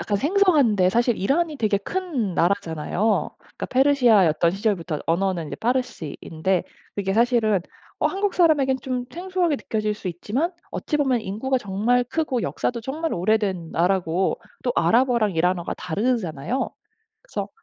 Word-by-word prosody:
약간 200 +4 -1
생소한데 285 - +3
사실 235 +2 +2
이란이 300 - 0
되게 215 -4 +1
큰 260 - -3
나라잖아요. 190 +3 0
그러니까 - - -8
페르시아였던 235 - +4
시절부터 185 -5 -1
언어는 175 -1 0
이제 - - -6
파르시인데 190 - -2 0.3
이게 195 -1 -1
사실은 225 -4 +3 0.4
어 - - +3
한국 395 0 -1
사람에겐 290 -7 +3
좀 250 -2 -2
생소하게 360 -2 0
느껴질 215 -3 -2
수 205 - -6
있지만 235 - -2 0.2
어찌 300 - -2
보면 265 -5 +1
인구가 225 +7 -1
정말 220 +4 +1
크고 260 -3 -1
역사도 235 - -2
정말 310 +7 -3
오래된 190 -3 0
나라고 180 +1 +1 0.2
또 245 - +1
아랍어랑 235 -3 +3
이란어가 175 +1 0
다르잖아요. 205 - -2 0.5
그래서 - - -5
220 Hz, 360 characters per minute, -23 LUFS, 185-265 Hz, 0.5 s, 페르시아였던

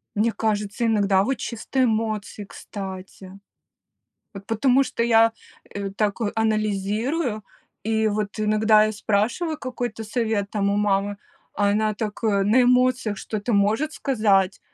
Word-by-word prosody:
Мне 220 +3 +2
кажется, 210 +1 -2
иногда, 200 -3 +3
вот, 265 +2 -1
чисто 255 +3 -2
эмоции, 215 -2 -2
кстати. 190 -1 -9 1.0
Вот, 195 0 -10
потому 250 +5 +3
что 250 -3 -2
я, 225 -1 +4 0.4
э, 200 -1 -4
так 205 +2 -1
анализирую, 215 +4 -1 0.4
и, 220 0 +1
вот, 210 0 -3
иногда 215 0 +4
я 215 - -1
спрашиваю 225 - -1
какой-то 245 -4 -5
совет, 215 -3 -1
там, 200 -2 0
у 200 - 0
мамы, 205 0 0 0.4
а 205 0 +2
она 215 +1 +1
так, 210 +1 -5
э, 200 -3 +2
на 225 +6 +4
эмоциях 250 -3 +2
что-то 215 +4 -4
может 220 +10 +1
сказать. 205 -7 +1
215 Hz, 135 wpm, -23 LUFS, 200-230 Hz, 1.0 s, я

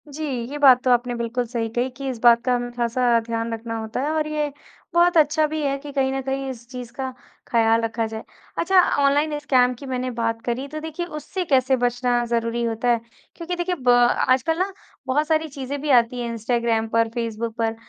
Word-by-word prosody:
जी, 295 +2 -7 0.3
ये 295 - -4
बात 265 -4 +6
तो 255 - +3
आपने 245 0 +2
बिल्कुल 235 +1 -2
सही 230 -1 -2
कही 245 +3 -1
कि 275 -1 -5
इस 255 - -4
बात 235 0 +6
का 250 - +2
हमें 245 0 -3
ख़ासा 240 0 +2
ध्यान 230 0 -2
रखना 225 0 -5
होता 220 +3 -4
है 295 +3 -1
और 310 -1 0
ये 300 -1 -2 0.4
बहुत 345 0 +4
अच्छा 310 0 +4
भी 310 +1 -3
है 275 -1 0
कि 290 +1 -9
कहीं 265 -1 +1
न 270 - -2
कहीं 270 0 -3
इस 240 -2 -9
चीज़ 250 -2 -8
का 260 0 -4 0.4
ख़्याल 225 -1 +3
रखा 225 0 -1
जाए। 220 0 -7 0.4
अच्छा 375 +2 +4
अ, 360 - +3
ऑनलाइन 290 +2 +2
स्कैम 255 -4 +3
की 250 +3 -11
मैंने 255 -1 -2
बात 230 -1 -2
करी 250 +3 -2
तो 305 +2 -6
देखिए 320 +2 -4
उससे 340 +3 -5
कैसे 265 -3 +3
बचना 245 0 +1
ज़रूरी 235 0 -1
होता 230 +1 -2
है? 235 -1 +3 0.4
क्योंकि 345 +1 -4
देखिए 355 +1 -1
ब 255 -6 -1 0.4
आजकल 260 +6 +2
ना 380 +2 0 0.4
बहुत 295 +4 +1
सारी 315 0 +1
चीज़ें 275 0 -5
भी 300 - -3
आती 245 -1 +4
है, 240 - -3
इंस्टाग्राम 230 0 0
पर 230 0 +1
फेसबुक 230 -1 -4
पर 225 0 0
250 Hz, 220 wpm, -23 LUFS, 235-290 Hz, 0.4 s, बात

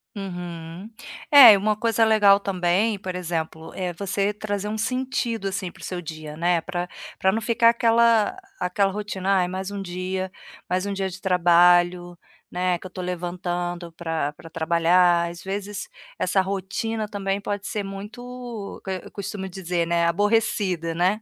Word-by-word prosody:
Uhum. 175 0 -7 0.4
É, 270 -6 +11
e - - +4
uma 210 +2 +1
coisa 225 +1 +2
legal 205 -2 +5
também, 195 +2 0
por 185 -2 -5
exemplo, 160 -2 -4
é 180 -2 -3
você 200 +2 -1
trazer 205 -1 -4
um 215 +1 -3
sentido, 235 -2 -2
assim, 190 -2 -3
para - - -17
o - - -11
seu 180 -1 -4
dia, 155 -1 -8
né, 170 0 +2
para 175 +2 -4 0.3
para 190 - +3
não 220 +3 -1
ficar 230 0 +4
aquela 230 - +3 0.2
aquela 195 +2 +1
rotina: 195 -1 -1
"Ai, 180 -1 +2
mais 190 +2 -4
um 200 - -4
dia, 185 0 -4 0.4
mais 185 +2 0
um 200 - -2
dia 195 -1 -2
de 185 - -9
trabalho, 175 -1 +4 0.4
né, 180 0 0
que 180 - -15
eu - - -6
estou 185 0 -6
levantando 175 -1 -3
para 165 -3 -2
para 165 +2 -14
trabalhar". 170 +1 +3
Às 170 -1 -10
vezes 205 +2 -5 0.3
essa 190 +1 +2
rotina 200 +3 -3
também 200 -1 -2
pode 205 0 -4
ser 210 - -3
muito 230 +2 -8
eh, 185 -1 -3
eu - - -11
costumo 195 -1 -5
dizer, 175 -2 -2
né, 170 0 +2
aborrecida, 185 -2 +1
né. 185 +6 +1
190 Hz, 165 wpm, -24 LUFS, 175-205 Hz, 0.4 s, É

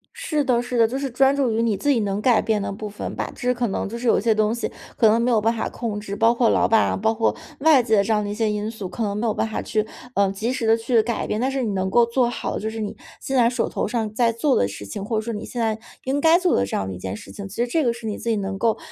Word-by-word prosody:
是 335 -12 -1
的 245 -3 +2
是 245 0 -3
的。 230 -1 +5
就 260 +4 -3
是 275 -1 -2
专 270 +3 +3
注 270 -4 +1
于 225 +1 0
你 225 -3 +1
自 290 - -1
己 265 -5 +4
能 200 0 -1
改 240 -3 +4
变 215 -2 0
的 200 - -3
部 210 +2 -6
分 205 - -6
吧。 - - -3
只 - - -13
是 250 0 +2
可 245 -1 -1
能 195 - -2
就 230 +3 -6
是 240 0 -3
有 - - +4
些 225 0 +2
东 215 0 +1
西， 235 - -3 0.3
可 225 - +5
能 225 +2 +4
没 245 - +1
有 225 - +4
办 225 +2 +1
法 225 - -2
控 220 -4 -4
制， 200 -1 -6
包 225 +3 +4
括 235 -1 +2
老 - - +3
板 225 -1 +4
啊， - - -1
包 220 +3 +1
括 225 0 +1 0.2
外 300 -2 +6
界 220 -4 +3
这 220 - -2
样 210 -1 +1
的 205 - -4
一 205 - -2
些 220 0 0
因 210 +1 -2
素， 215 -5 -6
可 230 - -4
能 200 -1 -1
没 210 +3 -2
有 215 - +1
办 - - -1
法 220 - -3
去， 215 -1 -1 0.3
呃， 200 -1 +3
及 215 +5 -2
时 255 -3 -2
地 225 - +6
去 230 0 +2
改 235 +1 -2
变。 210 - -1
但 260 +3 0
是 270 -1 -1
你 215 - -1
能 190 0 -1
够 235 +4 +5
做 235 +1 +1
好 - - -4
的 - - -2
就 220 - -2
是 225 0 -6
你 210 -2 -4 0.3
现 270 - -3
在 235 -1 +5
手 245 - -1
头 - - -2
上 225 -3 -2
在 230 +1 +2
做 245 +5 +1
的 100 - +2
事 100 0 -8
情， 100 - -6
或 220 +2 -2
者 215 - +1
说 230 +1 -4
你 210 - -5
现 240 - -4
在 220 -1 0 0.3
应 270 +2 0
该 325 +3 +5
做 365 -1 +2
的 95 - +2
这 100 - -4
样 95 - -1
的 95 - -4
一 90 - -7
件 95 +1 -5
事 - - -11
情， 200 -1 -7
其 195 - -11
实 240 +1 0
这 310 +5 +1
个 235 - +2
是 235 -1 -8
你 210 - -3
自 235 - -4
己 225 - +2
能 195 -1 -3
够 225 +1 +1
225 Hz, 365 characters per minute, -23 LUFS, 210-240 Hz, 0.3 s, 外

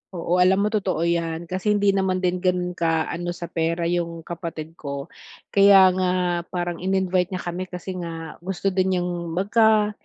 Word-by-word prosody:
Oo, 175 +1 0
alam 190 +2 +4
mo 210 - 0
totoo 190 -6 0
'yan. 170 -1 -1
Kasi 200 +3 +1
hindi 205 -1 +3
naman 190 -1 0
din 180 0 +1
ganun 180 -1 0
ka 165 -2 0
ano 175 0 -4
sa 170 -1 -7
pera 165 +1 -1
yung 170 -1 -2
kapatid 165 -2 -6
ko. 140 +1 -6 0.4
Kaya 195 -2 +7
nga 185 0 0 0.4
parang 175 -1 -3
in-invite 185 -1 +1
niya 185 - -5
kami 180 +1 -4
kasi 180 +1 -7
nga 165 -2 -7
gusto 190 +2 -2
din 190 0 +1
niyang 180 0 -1 0.2
magka 215 +2 +3
180 Hz, 175 wpm, -23 LUFS, 170-190 Hz, 0.4 s, Kaya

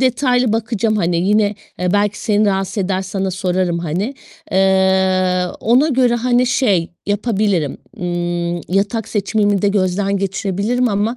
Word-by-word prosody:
detaylı 250 -2 +2
bakacağım 225 -1 0
hani, 175 -4 0
yine, 205 +4 +2 0.2
eee, 180 +1 0
belki 205 0 +1
seni 215 -2 +2
rahatsız 195 +1 -1
eder 190 0 -1
sana 195 0 -3
sorarım 180 -2 -1
hani. 180 - -3 0.4
Eee, 190 -1 +2 0.2
ona 250 +7 +3
göre 250 -4 +2
hani, 245 +1 +2
şey 200 -10 +1 0.2
yapabilirim, 205 - 0 0.2
ımm, 175 -1 -2
yatak 200 +4 -1
seçimimi 205 -1 0
de 205 - +3
gözden 195 0 0
geçirebilirim 200 +5 -1
ama 210 +3 -1
200 Hz, 135 wpm, -18 LUFS, 185-220 Hz, 0.4 s, ona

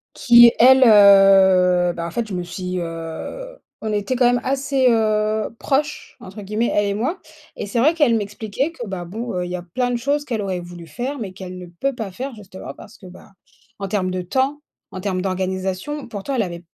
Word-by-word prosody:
Qui 240 -1 +7
elle, 260 +2 +7
heu, 195 -4 +6
bah, 170 0 -5
en 170 - -6
fait, 235 +2 -3
je 195 - -5
me 180 - -3
suis, 180 +1 -5
heu, 165 - -7 0.2
on 220 - -3
était 210 +4 -1
quand 250 0 +2
même 245 0 +2
assez, 275 0 0
heu, 215 -1 +1
«proches» 290 +1 -2
entre 210 -2 -10
guillemets, 215 +4 -1
elle 205 0 +1
et 200 - -1
moi 260 - -2 0.4
et - - -5
c'est 205 +4 -2
vrai 310 +7 +3
qu'elle 290 -8 +3
m'expliquait 220 +7 -3
que 245 -8 -8
bah, 185 -2 -5
bon, 225 +6 -6
heu, 180 0 -2
il - - -7
y 180 - -3
a 175 - -6
plein 245 +9 -2
de 245 - -1
choses 285 +4 -1
qu'elle 230 -6 -3
aurait 185 -2 -3
voulu 175 -1 -10
faire 255 - -5
mais 200 -7 -6
qu'elle 185 -1 -9
ne 180 - -9
peut 180 +10 -3
pas 220 -6 -5
faire, 255 +5 -6
justement, 190 -3 -10
parce 210 - -15
que, 185 - -13
ben, 185 +2 -15 0.5
en 195 - -4
termes 185 -2 -1
de 185 0 -3
temps, 265 +10 -1 0.3
en 185 - -7
termes 185 -2 -2
d'organisation 190 +8 -3
pourtant, 225 +5 -5
elle 230 - +1
avait 170 -2 -7
205 Hz, 220 wpm, -20 LUFS, 185-245 Hz, 0.5 s, Qui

